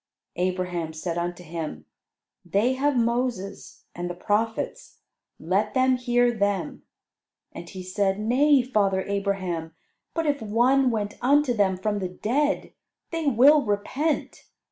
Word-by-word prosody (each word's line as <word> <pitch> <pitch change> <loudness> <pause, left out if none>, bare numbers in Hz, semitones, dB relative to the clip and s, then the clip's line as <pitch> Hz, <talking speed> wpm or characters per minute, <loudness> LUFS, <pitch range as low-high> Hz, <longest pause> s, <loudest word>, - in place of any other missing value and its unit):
Abraham 180 -2 -2
said 170 +2 -3
unto 175 +1 -4
him, 155 - -6 0.6
"They 200 +8 +1
have 275 +1 +1
Moses 235 -4 -2
and 175 0 -4
the 175 - -5
prophets; 220 +4 -2 0.4
let 200 +6 0
them 260 0 +4
hear 245 -1 +2
them." 200 -4 -1 0.7
And 170 - -9
he 185 -1 -8
said, 195 +1 0
"Nay, 260 +5 +4
father 200 -6 +1
Abraham: 190 -5 -2 0.4
but 330 -1 0
if 285 -2 0
one 250 +5 +3
went 210 -3 -3
unto 280 0 +3
them 195 -4 +1
from 205 +2 -1
the 185 -2 -3
dead, 275 +11 -1 0.4
they 330 -2 -2
will 280 +4 +6
repent." 260 +9 -2
210 Hz, 130 wpm, -25 LUFS, 185-255 Hz, 0.7 s, will